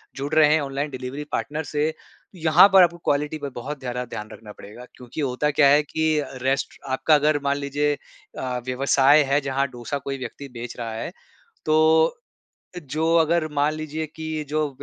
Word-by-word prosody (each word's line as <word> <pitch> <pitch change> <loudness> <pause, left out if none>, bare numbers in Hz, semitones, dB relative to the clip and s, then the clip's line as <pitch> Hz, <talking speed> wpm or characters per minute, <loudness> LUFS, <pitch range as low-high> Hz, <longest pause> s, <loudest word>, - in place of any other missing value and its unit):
जुड़ 140 +2 -5
रहे 155 -1 +6
हैं 160 - +3
ऑनलाइन 140 +1 -3
डिलिवरी 130 +3 -6
पार्टनर 155 +2 -2
से 150 +1 -1
तो 180 - -22
यहाँ 160 +4 +7
पर 190 - +9
आपको 170 0 +1
क्वालिटी 150 +2 0
पर 145 -2 -5
बहुत 140 +4 -6
ज़्यादा 125 -1 -4
ध्यान 105 -2 -7
रखना 105 -2 -11
पड़ेगा 115 +5 -12
क्योंकि 125 +4 -7
होता 140 +2 0
क्या 145 -1 +4
है 145 +2 +5
कि 155 0 0 0.2
रेस्ट 135 +2 -1
आपका 140 +4 +3
अगर 150 0 +2
मान 140 0 +1
लीजिए 145 +1 0 0.5
अ, 125 -1 -3
व्यवसाय 135 +3 +4
है 145 - +4
जहाँ 135 0 -1
डोसा 120 +3 -4
कोई 135 0 -5
व्यक्ति 135 +2 -8
बेच 120 0 -6
रहा 115 -2 -4
है 115 - -5 0.5
तो, 160 +1 +4 0.6
जो 155 +3 -1
अगर 165 0 +2
मान 145 +1 +2
लीजिए 155 0 -4
की 160 0 -5
अ, - - -9
जो 150 +1 -1
145 Hz, 185 wpm, -23 LUFS, 135-155 Hz, 0.6 s, पर